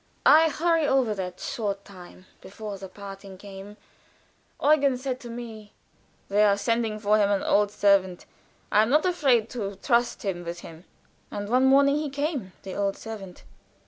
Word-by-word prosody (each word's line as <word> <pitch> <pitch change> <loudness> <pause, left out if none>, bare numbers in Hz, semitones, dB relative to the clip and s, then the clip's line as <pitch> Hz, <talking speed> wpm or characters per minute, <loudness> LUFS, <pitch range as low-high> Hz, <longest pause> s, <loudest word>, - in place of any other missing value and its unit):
I 320 +1 +7
hurry 330 0 +1
over 260 -6 +2
that 185 -2 -5
short 200 -3 -4
time 185 -1 -14 0.2
before 205 0 -8
the 190 0 -8
parting 195 0 -10
came. 200 +1 -11 0.8
Eugen 285 -3 +3
said 255 0 -4
to 240 - -10
me: 225 -3 -9 0.5
"They 205 +1 +3
are 200 -1 +4
sending 225 0 0
for 215 0 +2
him 200 -1 +3
an 200 -1 +1
old 205 0 +3
servant. 200 -3 +2 0.5
I 210 - +5
am 220 - +1
not 300 +5 +3
afraid 270 -11 +2
to 200 -5 -4
trust 240 +4 0
him 185 -4 -3
with 170 0 -6
him." 165 +2 -12 0.4
And 205 0 -5
one 255 +3 +3
morning 280 +1 +5
he 300 -1 -2
came 280 - -3
the 190 - -7
old 200 -1 -1
servant. 205 -5 -9
210 Hz, 170 wpm, -26 LUFS, 195-255 Hz, 0.8 s, I